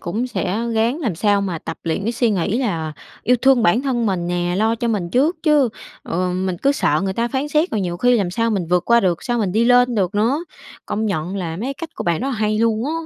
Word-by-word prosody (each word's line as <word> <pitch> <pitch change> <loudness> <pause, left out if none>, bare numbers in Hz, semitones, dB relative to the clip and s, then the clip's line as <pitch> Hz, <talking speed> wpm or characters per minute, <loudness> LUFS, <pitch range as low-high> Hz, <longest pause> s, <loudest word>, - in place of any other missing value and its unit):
cũng 220 +9 -2
sẽ 215 -3 -2
ráng 235 +8 +1
làm 230 - -1
sao 205 +3 +2
mà 185 -5 -3
tập - - -7
luyện 165 +3 -1
cái 230 +4 -1
suy 235 -1 +1
nghĩ 200 +4 0
là 165 - -2 0.3
yêu 250 +2 +3
thương 265 -3 +5
bản 225 +7 +3
thân 240 -4 0
mình 180 -3 -1
nè, 175 0 -1
lo 220 +2 +2
cho 235 +1 -2
mình 190 -6 -1
trước 295 - +2
chứ, 300 -5 +4 0.3
ờ, 180 +1 -2
mình 185 -1 -2
cứ 280 - +4
sợ 155 - +1
người 190 - -1
ta 235 +4 -1
phán 275 +3 -2
xét 310 +4 +1
rồi 210 - -1
nhiều 175 -2 -2
khi 245 +5 +3
làm 190 -5 0
sao 230 +4 0
mình 190 -6 -1
vượt 180 +1 +1
qua 235 0 +4
được, 180 -4 0
sao 240 -2 -1
mình 200 -5 0
đi 225 +3 +2
lên 245 0 +4
được 195 -2 0
nữa. 250 +11 +1 0.4
Công 220 +1 -2
nhận 185 0 -2
là 165 -3 -4
mấy 225 +7 -4
cái 275 - -3
cách 330 +1 -7
của - - -5
bạn 170 +3 0
rất 270 - -2
là 270 - -2
hay 215 0 0
luôn 225 0 +1
á. 310 - -2
215 Hz, 270 wpm, -20 LUFS, 180-245 Hz, 0.4 s, thương